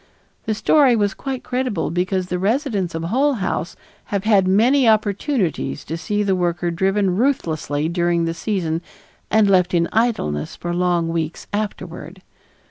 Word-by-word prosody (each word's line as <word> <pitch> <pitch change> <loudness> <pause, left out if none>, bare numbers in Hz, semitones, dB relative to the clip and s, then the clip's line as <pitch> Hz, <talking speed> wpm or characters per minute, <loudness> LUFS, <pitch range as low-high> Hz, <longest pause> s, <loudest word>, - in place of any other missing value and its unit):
The 220 - 0
story 270 +2 +4
was 205 -2 +1
quite 265 -2 -5
credible 250 -11 -2
because 185 +2 0
the 180 0 -3
residents 205 - 0
of 165 - -3
Hull 265 +11 +2
House 185 -5 -3 0.3
have 200 -2 -2
had 205 -4 +3
many 235 +6 +4
opportunities 215 - 0
to 160 - -4
see 205 +5 -1
the 195 -2 +1
worker 175 -1 -1
driven 190 +2 +1
ruthlessly 160 - 0
during 170 0 +1
the 165 - -1
season 170 -3 -2 0.5
and 215 -1 +4
left 185 -2 +3
in 170 0 +2
idleness 215 - 0
for 175 0 -4
long 175 -1 +1
weeks 165 -1 -3
afterward. 185 -4 -5
190 Hz, 150 wpm, -20 LUFS, 170-220 Hz, 0.5 s, story